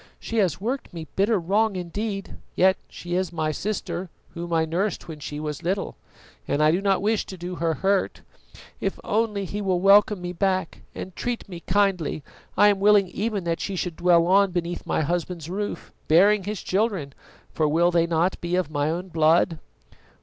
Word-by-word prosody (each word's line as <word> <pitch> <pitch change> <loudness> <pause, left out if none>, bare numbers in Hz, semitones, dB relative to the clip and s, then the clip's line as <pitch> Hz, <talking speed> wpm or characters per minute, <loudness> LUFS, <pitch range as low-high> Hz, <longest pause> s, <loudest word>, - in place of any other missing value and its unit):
"She 230 - -4
has 185 -5 +2
worked 235 -1 -4
me 165 -1 -6
bitter 205 +2 +2
wrong 200 +4 +1
indeed, 195 +3 -4 0.2
yet 190 +1 +5
she 175 0 -7
is 185 0 0
my 155 -2 -1
sister, 185 0 -3 0.2
whom 170 0 -7
I 165 -1 +2
nursed 175 +5 -2
when 160 -2 -8
she 145 0 -6
was 150 -1 -4
little, 190 +3 -2 0.5
and 145 - 0
I 155 0 +5
do 175 +4 +1
not 195 -1 +1
wish 215 0 +1
to 190 - -8
do 175 +1 -6
her 165 -1 0
hurt. 195 +2 0 0.6
If - - -2
only 210 -2 0
he 205 +3 -4
will 190 -3 +1
welcome 200 +1 +5
me 180 0 -5
back 185 -1 -1
and 185 -1 -7
treat 240 -2 -3
me 180 -3 -8
kindly, 185 -6 0 0.3
I 205 - +7
am 200 -1 +1
willing 200 -2 +5
even 210 -1 -2
that 170 -1 -1
she 195 - -3
should 180 -2 -3
dwell 170 -1 +4
on 195 +2 +4
beneath 175 -1 -3
my - - +1
husband's 170 +1 -3
roof, 205 +2 -4
bearing 195 +5 +5
his 210 -1 -4
children, 190 - -1 0.4
for 155 - +1
will 170 +4 +3
they 170 -1 +2
not 170 +2 0
be 175 +1 -1
of 180 -5 -1
my 145 0 0
own 180 +3 -3
blood?" 160 0 +3
180 Hz, 190 wpm, -24 LUFS, 170-200 Hz, 0.6 s, I